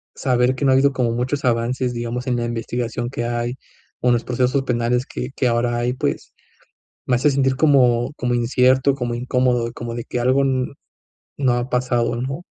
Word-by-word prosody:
saber 125 -1 +1
que 130 - -4
no 135 - +4
ha - - +5
habido 140 +1 +3
como 125 -3 0
muchos 130 +4 -2
avances, 125 +1 0
digamos, 120 +1 -4
en 125 -1 +1
la 120 - -1
investigación 120 0 -3
que 120 -2 -3
hay, 120 +1 -2 0.5
o - - 0
en - - +5
los 120 -1 0
procesos 125 +2 0
penales 125 0 0
que 125 0 -6
que 130 - +1
ahora 120 0 +1
hay, 120 +1 0
pues, 130 - -3 0.7
me 125 - +2
hace 135 +5 +3
sentir 135 -1 +1
como 130 -4 +3
como 125 -1 -1
incierto, 130 +3 +3
como 120 -3 -3
incómodo, 125 -1 0
como 120 -1 -6
de 120 -1 -5
que 125 - -3
algo 130 +3 +3
n 130 -1 0 0.7
no 130 -3 +2
ha 120 +1 -2
pasado, 125 -1 0
¿no? 135 +8 -4
125 Hz, 195 wpm, -21 LUFS, 120-130 Hz, 0.7 s, ha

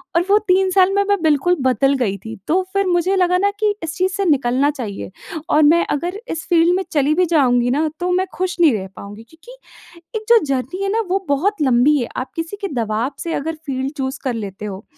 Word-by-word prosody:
और 335 - +4
वो 410 - +6
3 380 +1 +3
साल 375 0 +4
में 400 0 +2
मैं 405 -3 +2
बिल्कुल 315 +3 +2
बदल 260 +1 +2
गई 205 -6 -1
थी। 220 +3 -9
तो 360 +4 +2
फ़िर 395 0 +1
मुझे 355 +2 +1
लगा 360 -1 +2
ना 400 +2 +2
कि 425 -2 +2
इस 325 -1 -4
चीज़ 370 +1 +1
से 395 +1 -2
निकलना 275 -3 +2
चाहिए 225 -10 -6 0.4
और 305 - +4
मैं 330 +4 +4
अगर 350 +7 -4
इस 325 +1 -5
फील्ड 340 0 +4
में 380 - -1
चली 290 0 +2
भी 365 +2 +3
जाऊँगी 250 -7 +2
ना 300 +4 +1
तो 360 0 -1
मैं 370 +1 +1
खुश 365 -1 -3
नहीं 315 -6 +6
रह 195 -3 -3
पाऊँगी। 205 +2 -10
क्योंकि 480 +10 -16 0.6
एक 435 - -12
जो 470 0 +7
जर्नी 275 +6 -3
है 395 - -1
ना 450 - +1
वो 385 +1 -1
बहुत 315 +7 0
लंबी 265 +2 +4
है 240 - -3
आप 255 - -4
किसी 330 +4 -4
के 400 - -3
दबाव 230 +2 -1
से 335 - -4
अगर 320 +3 -3
फील्ड 265 0 -3
चूज़ 265 -1 -3
कर 255 -3 -1
लेते 205 -2 -6
हो, 200 0 -6
315 Hz, 230 wpm, -19 LUFS, 255-370 Hz, 0.6 s, जो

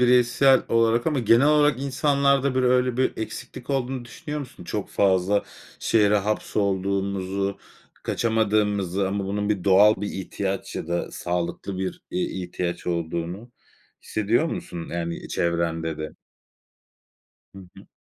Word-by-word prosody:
bireysel 125 +2 +5
olarak 115 +1 +2
ama 150 -3 +1
genel 120 +3 +5
olarak 150 -3 +4
insanlarda, 140 0 +2
hani, 130 0 -1
öyle 125 -1 +2
bir 130 - +2
eksiklik 125 +4 -6
olduğunu 130 -2 -1
düşünüyor 150 +5 -6
musun? 125 -10 -10
Çok 105 +2 -3
fazla 95 +1 +2 0.4
şehre 105 -2 +3
hapsolduğumuzu, 100 -1 -1 0.4
kaçamadığımızı 105 -4 +1
ama 100 0 -2
bunun 105 -1 -1
doğal 100 +3 +6
bir 105 - -2
ihtiyaç 95 0 -4
ya - - -4
da 85 0 -2
sağlıklı 90 +2 -3
bir, 95 -1 -4
eee, 90 - -1
ihtiyaç 90 -1 -4
olduğunu 85 +6 -3 0.5
hissediyor 110 +8 +1
musun, 85 - -5
yani, 85 -1 -4
çevrende 85 -2 -1
de? 75 0 -6 1.4
Hı 95 - -10 0.2
hı. - - -14
100 Hz, 125 wpm, -24 LUFS, 95-125 Hz, 1.4 s, doğal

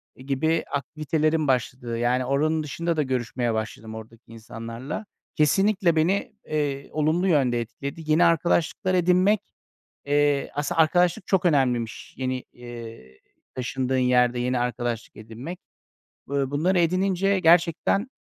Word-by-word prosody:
gibi 140 +5 0
aktivitelerim 155 +1 0
başladı. 125 -2 -1
Yani, 125 +2 +1
oranın 155 +4 +1
dışında 165 +2 -2
da 150 - +2
görüşmeye 120 -2 -1
başladım 110 0 -5
oradaki 110 +1 -11
insanlarla. 115 - -7 0.3
Kesinlikle 190 +3 +3
beni, 195 +9 +1
eee, 145 -2 -2
olumlu 155 +5 +1
yönde 130 -8 +2
etkiledi. 140 +7 -6
Yeni 165 +3 +5
arkadaşlıklar 170 +2 +1
edinmek, 185 +3 +3 0.7
eee 145 -1 +1
aslında 145 +3 0
arkadaşlık 175 +3 +2
çok 190 -2 +1
önemliymiş 125 -8 0
yeni, 130 0 -2
eee, 115 - -11 0.3
taşındığın 130 0 -2
yerde 125 -1 +3
yeni 125 +1 0
arkadaşlık 120 -1 -3
edinmek. 115 +11 -8 0.7
Iıı, 140 -1 0
bunları 175 +6 +1
edinince 190 +3 +1
gerçekten, 170 +5 +3
145 Hz, 120 wpm, -25 LUFS, 125-170 Hz, 0.7 s, Yeni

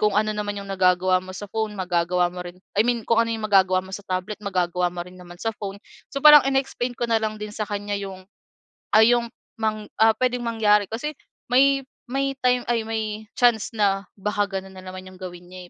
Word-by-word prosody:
kung 210 -1 +3
ano 215 +1 +2
naman 205 -1 -3
yung 200 - -9
nagagawa 185 -1 +3
mo 185 - -8
sa 205 - -7
phone 220 -1 -2
magagawa 180 -1 +1
mo 180 0 -6
rin, 175 +1 -10 0.2
I - - +7
mean 240 -2 +1
kung 230 0 +4
ano 230 - -3
yung 220 -1 -3
magagawa 190 -2 +4
mo 190 - -12
sa 205 - -7
tablet 185 +3 -3
magagawa 180 -2 0
mo 175 - -6
rin 180 - -13
naman 175 -1 -12
sa 225 - 0
phone." 200 -1 -6 0.3
So, 275 - -2
parang 300 -1 +10
in-explain 260 -2 -1
ko 240 - 0
nalang 220 -1 0
din 210 0 -6
sa 215 - -3
kanya 205 0 -3
yung 190 -1 -8 0.7
ay 220 +2 +7
yung 235 -1 -3 0.3
mang 215 -1 -1 0.2
ah, 225 0 +7
puwedeng 250 -1 0
mangyari. 210 -3 +3
Kasi 300 +7 -4 0.4
may 275 +1 +4 0.3
may 275 +1 0
time 250 -1 +2
ay, 230 -2 +1
may 220 -1 -3
chance 240 -3 +3
na 195 -2 +1
baka 205 +1 0
ganun 190 0 -11
nanaman 185 0 -9
yung 185 - -16
gawin 175 -1 -8
niya, 185 -1 -10
210 Hz, 210 wpm, -24 LUFS, 185-230 Hz, 0.7 s, parang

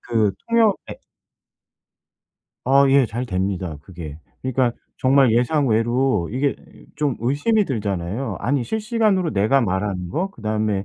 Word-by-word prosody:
그 110 -4 +1 0.2
통역 225 -3 +4
앱 - - -11 1.6
아 135 +2 +5
예 135 -2 +5
잘 120 +3 -4
됩니다 95 -4 -2
그게. 80 -3 -9 0.2
그러니까 130 -2 +1 0.2
정말 130 -2 +4
예상 130 +4 +2
외로 115 -3 +1
이게 135 +2 0 0.4
좀 145 -4 0
의심이 145 - +1
들잖아요. 105 - -3
아니 135 -1 0
실시간으로 215 - 0
내가 110 +8 +3
말하는 95 -3 -2
거, 185 - -2
그다음에 110 - -2
120 Hz, 270 characters per minute, -21 LUFS, 100-140 Hz, 1.6 s, 아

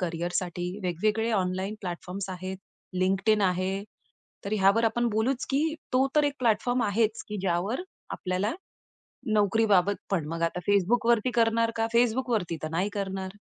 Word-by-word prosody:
करियरसाठी 175 0 -2 0.2
वेगवेगळे 215 +6 0
online 190 +1 -1
platforms 185 +1 -5
आहेत. 185 +1 -5 0.4
Linkedin 195 +3 +2
आहे. 185 +2 0 0.6
तर 200 - -4
ह्यावर 200 +4 +4
आपण 240 +2 +1
बोलूच, 235 +5 0
की 310 +3 +1 0.2
तो 260 +1 +4
तर 300 - +5
एक 285 -1 0
प्लॅटफॉर्म 240 +2 +2
आहेच, 215 +2 +1
की 210 - -4
ज्यावर 195 - 0 0.3
आपल्याला 185 +4 -1 0.8
नोकरीबाबत 205 -2 +3
पण 175 -6 0
मग 165 +1 -4
आता 170 +1 0
Facebookवरती 230 +4 +3
करणार 230 0 +3
का, 225 0 +1
Facebookवरती 235 -7 +1
तर - - -2
नाही 180 +5 0
करणार. 190 0 -4
200 Hz, 140 wpm, -27 LUFS, 185-230 Hz, 0.8 s, तर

